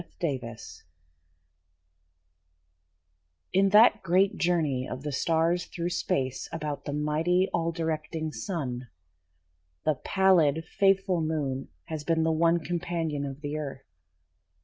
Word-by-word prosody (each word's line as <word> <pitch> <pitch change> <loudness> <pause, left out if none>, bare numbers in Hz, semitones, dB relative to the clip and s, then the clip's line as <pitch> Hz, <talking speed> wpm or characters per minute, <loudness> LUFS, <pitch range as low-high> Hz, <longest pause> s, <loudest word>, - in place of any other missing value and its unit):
A - - -11 0.2
SOLAR 170 -5 0
ECLIPSE 115 -3 -8 2.7
In 195 +1 +4
that 210 +1 +6
great 190 +2 +3
journey 155 -7 0
of 130 +2 -6
the 150 - -3
stars 165 +4 +1
through 175 +1 -3
space 130 -6 -1
About 150 -3 -4
the - - -3
mighty, 155 +5 +1
all 165 0 +1
directing 160 -1 -3
Sun, 125 - -4 1.0
The 155 - +4
pallid, 170 -5 +3
faithful 195 -3 +2
Moon 145 -4 -2 0.2
has 155 -2 -5
been 160 +1 +1
the 160 - +2
one 165 +1 +3
Companion 165 -4 -2
of 135 +1 -8
the 145 0 -3
Earth. 140 -3 -6
160 Hz, 125 wpm, -28 LUFS, 145-175 Hz, 2.7 s, that